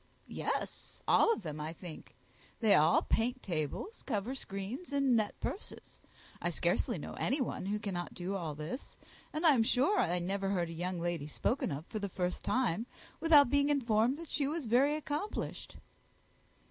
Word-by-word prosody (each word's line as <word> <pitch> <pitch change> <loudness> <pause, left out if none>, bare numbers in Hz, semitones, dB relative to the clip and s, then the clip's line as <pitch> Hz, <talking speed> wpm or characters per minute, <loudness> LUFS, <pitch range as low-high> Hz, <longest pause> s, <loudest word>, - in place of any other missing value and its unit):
"Yes, - - -4
all 460 - +5
of 340 - -1
them, 155 -2 -5
I 155 +2 -4
think. 170 -2 -10 0.4
They 220 -3 +5
all 155 +3 +5
paint 245 +3 0
tables, 170 - -3
cover 225 +1 -2
screens, 235 - -5
and 275 -3 +3
net 215 -2 0
purses. 405 - -6 0.4
I - - 0
scarcely - - +1
know - - -6
any 280 - +1
one 245 -6 -2
who 210 +1 0
cannot 195 -5 -4
do 185 +2 -3
all 165 -6 -3
this; 155 - -6 0.3
and 310 +3 -2
I 315 - +8
am 245 - +4
sure 265 - +3
I 175 +1 +2
never 195 +2 -1
heard 175 -4 0
a - - -6
young 175 +2 -3
lady 170 -4 -2
spoken 235 - -1
of 145 +3 -4
for 215 - -5
the 200 -1 -3
first 180 0 -2
time, 235 -3 +1 0.3
without 295 -6 +6
being 285 0 +3
informed 245 -2 +2
that 335 -1 -9
she 285 -2 +1
was 310 -1 -2
very 260 +6 +4
accomplished." 305 +6 -4
215 Hz, 175 wpm, -33 LUFS, 175-280 Hz, 0.4 s, I